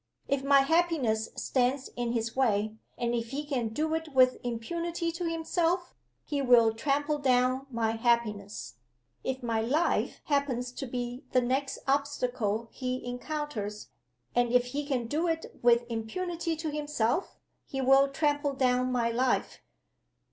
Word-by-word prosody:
If 275 -1 0
my 275 0 +6
happiness 275 -8 +1
stands 260 +1 0
in 240 -1 -1
his 230 -1 -2
way 215 -5 +2 0.2
and 240 -1 -1
if 230 -1 -2
he 285 +4 -4
can 260 -6 -1
do 310 +8 -1
it 320 -3 -3
with 255 -1 +6
impunity 335 +8 -2
to 340 0 -3
himself 340 +2 0 0.3
he 285 -2 -1
will 240 -4 +5
trample 290 +5 0
down 255 0 +2
my 230 -3 0
happiness. 225 - -1 0.5
If 260 0 -3
my 230 -2 0
life 285 +9 +1
happens 265 -4 0
to 265 +2 -6
be 245 +2 -4
the 255 - +5
next 265 +3 -1
obstacle 250 -6 0
he 255 -1 -3
encounters 245 -5 -4 0.4
and 245 -1 +2
if 250 0 +4
he 290 0 -2
can 255 -5 0
do 305 +9 0
it 325 -1 -3
with 235 0 +5
impunity 330 +9 -3
to 315 -1 -3
himself 295 - -1 0.3
he 270 - -4
will 270 +1 +5
trample 290 0 0
down 255 -1 +2
my 235 -2 +1
life. 250 +2 0
255 Hz, 150 wpm, -29 LUFS, 235-295 Hz, 0.5 s, my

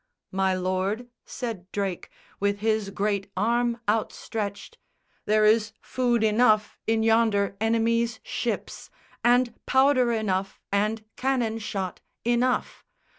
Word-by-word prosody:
"My 190 0 +1
lord," 185 +6 -1 0.2
said 220 -8 -6
Drake, 195 -3 -3 0.3
with 200 0 +1
his 215 -2 +1
great 200 0 -1
arm 235 +3 +1
outstretched, 215 - -3 0.5
"There 215 0 +3
is 220 0 +3
food 240 -3 0
enough 215 -1 +3
in 225 0 +2
yonder 220 -3 +3
enemy's 230 +1 +1
ships, - - -4 0.3
And 245 0 +4
powder 265 -2 +4
enough 195 -4 -1
and 215 +2 0
cannon 245 -4 0
shot 195 -4 -4 0.2
enough! 240 +1 +1
220 Hz, 110 wpm, -26 LUFS, 200-235 Hz, 0.5 s, And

